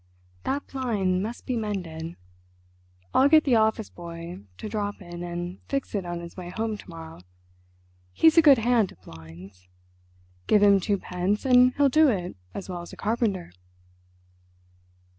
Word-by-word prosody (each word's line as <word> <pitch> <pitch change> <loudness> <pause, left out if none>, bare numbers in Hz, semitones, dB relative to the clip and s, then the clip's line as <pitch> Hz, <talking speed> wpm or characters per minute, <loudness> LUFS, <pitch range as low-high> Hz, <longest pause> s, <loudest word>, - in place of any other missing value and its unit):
"That 280 +1 -1
blind 205 -9 -1
must 225 +4 -6
be 255 - -1
mended. 175 -7 -4 1.0
I'll 270 +2 +5
get 310 0 +6
the 270 - +1
office 220 0 +1
boy 170 0 -8 0.2
to - - -6
drop 205 -1 -3
in 175 -2 -9
and 175 +1 -5
fix 275 -1 -2
it 195 -4 -2
on 175 0 -4
his 170 0 -10
way 180 -2 -7
home 220 +4 -2
to 205 - -12
morrow—he's 90 - -3
a 330 - +8
good 290 -4 +7
hand 230 -3 +2
at 95 - -26
blinds. 90 +3 -13 0.8
Give 210 -1 +4
him 200 -1 +6
twopence 190 +1 -1
and 250 -1 +5
he'll 285 -1 +4
do 310 +3 +5
it 185 -8 -1 0.2
as 195 - -6
well 180 -2 -5
as 175 - -10
a - - -11
carpenter.... 210 - -1
190 Hz, 155 wpm, -26 LUFS, 170-225 Hz, 1.0 s, a